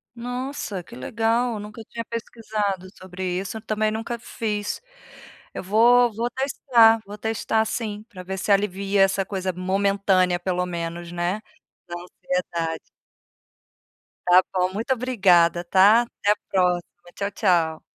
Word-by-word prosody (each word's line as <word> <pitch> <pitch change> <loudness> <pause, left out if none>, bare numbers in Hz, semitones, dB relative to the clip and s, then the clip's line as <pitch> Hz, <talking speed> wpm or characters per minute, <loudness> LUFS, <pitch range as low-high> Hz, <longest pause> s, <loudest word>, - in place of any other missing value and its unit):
Nossa, 245 -5 -4
que - - -16
legal! 225 - 0
Nunca 210 +2 -9
tinha 230 - -5
pesquisado 215 -4 -3
sobre 185 0 -8 0.2
isso, 200 +3 -5
também 215 0 0
nunca 225 +2 -4
fiz. 210 -3 -3 0.7
Eu - - -5
vou 235 +4 +5
vou 235 +3 -2
testar, 240 -3 +4
vou 205 +1 -9
testar 220 +1 0
sim, 215 -2 -4
pra 185 - -10
ver 190 +1 -5
se 195 - -1
alivia 200 0 +2
essa 195 0 +1
coisa 190 -1 -3
momentânea 190 -1 +1
pelo 180 0 -1
menos, 170 -1 -5
né, 175 +4 -2 0.5
da 175 - -6
ansiedade. 175 -2 -3 1.5
Está 180 +1 +7
bom, 185 0 +1
muito 230 +6 0
obrigada, 190 -9 +3
tá? 200 +6 +5
Até 210 -3 -1
a - - +3 0.2
próxima, 180 -2 +2 0.3
tchau 200 0 -3
tchau. 170 -6 +1
200 Hz, 135 wpm, -24 LUFS, 180-225 Hz, 1.5 s, Está